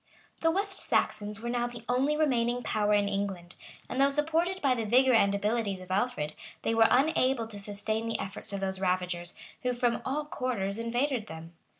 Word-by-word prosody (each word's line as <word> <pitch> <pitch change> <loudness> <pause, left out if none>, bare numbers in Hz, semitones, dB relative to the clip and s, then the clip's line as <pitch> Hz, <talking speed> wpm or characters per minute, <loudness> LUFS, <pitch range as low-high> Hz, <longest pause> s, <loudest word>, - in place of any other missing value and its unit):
The 325 - +3
West 390 +3 0
Saxons 210 0 0
were 235 - -3
now 240 0 0
the 240 -1 -8
only 270 +5 +2
remaining 245 -5 +1
power 210 -1 0
in 205 -1 +2
England; 195 -3 -3 0.3
and 260 - -1
though 275 - +5
supported 325 +6 +1
by 275 -6 +3
the 235 -2 -2
vigor 255 +4 +4
and 200 -3 +4
abilities 205 -1 0
of 185 0 -10
Alfred, 190 -7 0 0.3
they 225 - +1
were 225 0 +6
unable 260 -3 +3
to 215 -2 -8
sustain 215 +3 -3
the 230 - -1
efforts 195 +2 -5
of 200 -1 -3
those 190 -1 -2
ravagers, 180 -2 -1 0.3
who 250 0 0
from 240 -1 0
all 295 +3 -2
quarters 230 -8 -2
invaded 240 0 -1
them. 160 +1 -9
230 Hz, 190 wpm, -29 LUFS, 200-255 Hz, 0.3 s, were